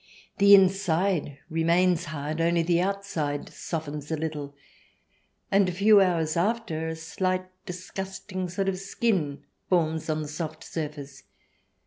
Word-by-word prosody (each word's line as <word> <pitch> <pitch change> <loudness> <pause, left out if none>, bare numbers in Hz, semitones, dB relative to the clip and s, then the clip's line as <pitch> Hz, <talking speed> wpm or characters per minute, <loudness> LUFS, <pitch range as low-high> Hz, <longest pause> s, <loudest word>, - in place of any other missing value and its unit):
The 200 0 +9
inside 185 -5 +2
remains 170 +1 +2
hard, 155 +1 -3
only 170 0 +2
the 170 +1 +2
outside 180 -7 -2
softens 150 -3 -5
a 160 - -1
little, 150 -2 -4 1.0
and 195 -1 +4
a - - -1
few 200 +3 +6
hours 165 -4 +1
after, 175 -4 0
a 160 - -3
slight, 185 +3 -2 0.2
disgusting 185 +1 -5
sort 195 +2 -2
of 190 -1 -1
skin 190 -7 -1 0.3
forms 160 -3 +1
on 155 0 0
the - - -6
soft 155 +1 -5
surface. 145 -3 -6
170 Hz, 130 wpm, -27 LUFS, 155-190 Hz, 1.0 s, The